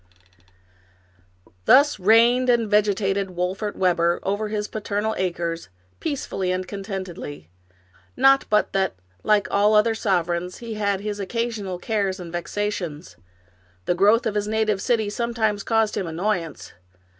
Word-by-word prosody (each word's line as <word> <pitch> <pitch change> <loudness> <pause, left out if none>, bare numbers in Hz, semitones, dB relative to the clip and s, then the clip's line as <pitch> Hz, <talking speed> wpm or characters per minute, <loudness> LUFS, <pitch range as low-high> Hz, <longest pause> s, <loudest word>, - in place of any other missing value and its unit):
Thus 285 -2 +5
reigned 235 +6 +4
and 235 -2 +3
vegetated 200 -2 +1
Wolfert 190 +4 -2
Webber 175 -2 +2
over 205 +2 -1
his 210 0 -3
paternal 215 0 -2
acres, 170 -2 -3 0.3
peacefully 225 - -2
and 185 0 -2
contentedly. 185 - -7 0.7
Not 270 +1 +5
but 210 0 +2
that, 190 - 0 0.3
like 210 -2 +3
all 205 +2 +3
other 220 +2 +4
sovereigns, 180 -4 -1
he 235 -2 -7
had 200 -2 -1
his 205 0 -4
occasional 210 -2 -3
cares 195 0 -1
and 175 -2 -8
vexations. 175 -2 -4 0.7
The - - +2
growth 205 +6 +4
of 220 - 0
his 205 0 -1
native 215 -2 0
city 225 -3 +1
sometimes 220 -2 -1
caused 225 0 +1
him 185 - -2
annoyance. 170 0 -3
205 Hz, 130 wpm, -23 LUFS, 185-220 Hz, 0.7 s, Thus